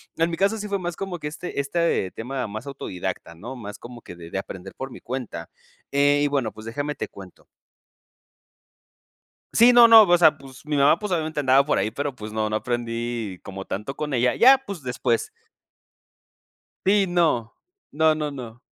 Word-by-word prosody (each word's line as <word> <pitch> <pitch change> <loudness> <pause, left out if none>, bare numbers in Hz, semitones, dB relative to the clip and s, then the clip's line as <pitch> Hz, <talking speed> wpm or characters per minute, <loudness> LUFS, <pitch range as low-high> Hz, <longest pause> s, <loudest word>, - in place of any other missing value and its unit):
en 165 +1 +1
mi 165 - -3
caso, 200 +3 +2
sí 210 -1 -6
fue 200 -1 -1
más 175 -1 -4
como 190 -2 -5
que, 150 - -5
este 160 +1 -6
este 140 - 0
tema 125 +2 -4
más 110 +6 -7
autodidacta, 90 -10 -5
¿no?, 120 +10 -8
más 105 -3 -8
como 120 0 -11
que 90 - -11
de 85 -1 -11
de - - -3
aprender 95 0 -9
por 135 - -6
mi 120 - -12
cuenta. 120 -10 -6 0.4
Eh, 145 +1 +3
y - - +3
bueno, 135 -6 -1
pues 110 - -12
déjame 145 +5 -3
te - - -5
cuento. 95 -2 -14 2.1
Sí, 235 +2 +7
no, 240 -1 +8
no, 225 -1 +10
o 175 -3 +4
sea, 160 -3 +5
pues, 135 +2 -14
mi 150 -1 -2
mamá, 145 +4 +4
pues, 210 -2 -5
obviamente, 160 -3 -1
andaba 135 0 +4
por 150 - +1
ahí, 100 +2 0
pero, 140 +5 -3
pues, 110 -3 -9
no, 110 -1 -1
no 110 - -1
aprendí 115 -4 -3
como 95 0 -8
tanto 105 +8 -5
con 150 -2 -4
ella. 125 0 +2
Ya, 265 +3 +7
pues, 195 - -7
después. 125 -2 -1 1.6
Sí, 200 +1 +4
no. 165 -10 +1 0.4
No, 160 +1 +3
no, 150 -1 -3
no. 120 -4 -9
135 Hz, 190 wpm, -24 LUFS, 115-160 Hz, 2.1 s, no